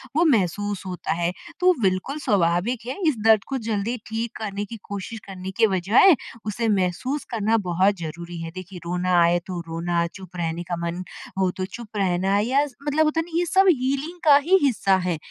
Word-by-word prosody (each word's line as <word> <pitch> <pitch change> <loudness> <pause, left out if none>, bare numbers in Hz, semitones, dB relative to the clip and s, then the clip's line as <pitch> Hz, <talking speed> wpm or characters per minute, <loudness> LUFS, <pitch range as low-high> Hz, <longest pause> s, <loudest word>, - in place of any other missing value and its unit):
वो 335 +3 +4
महसूस 205 - +1
होता 180 -1 -3
है 170 +1 0 0.3
तो 365 0 +5
बिल्कुल 190 +7 0
स्वाभाविक 195 - +1
है 255 - -4
इस 305 - +3
दर्द 220 -2 +6
को 270 - -2
जल्दी 220 +2 -1
ठीक 225 +1 -3
करने 205 -2 -4
की 230 +3 -8
कोशिश 200 +3 -6
करने 190 -1 -7
के 225 -1 +5
बजाय 200 - +5 0.3
उसे 220 +2 -1
महसूस 200 - 0
करना 225 -1 +1
बहुत 185 +4 +3
ज़रूरी 170 +2 -6
है। 165 0 -6
देखिए 185 0 -8
रोना 180 +1 -1
आए 170 +1 +4
तो 180 -2 -4
रोना, 170 +1 -1
चुप 185 +1 -12
रहने 170 0 -2
का 175 0 -3
मन 170 +1 -4 0.4
हो 190 -1 +3
तो 185 - -1
चुप 215 +2 -9
रहना 190 0 +1
या 260 +7 +2 0.2
मतलब 305 +2 +3
होता 305 +1 +1
है - - +1
ना 335 -1 -4
ये 350 - +1
सब 380 +3 +4
हीलिंग 280 +3 0
का 290 -2 +8
ही 335 +7 +4
हिस्सा 215 -8 +3
है। 175 -3 0
200 Hz, 195 wpm, -24 LUFS, 180-250 Hz, 0.4 s, का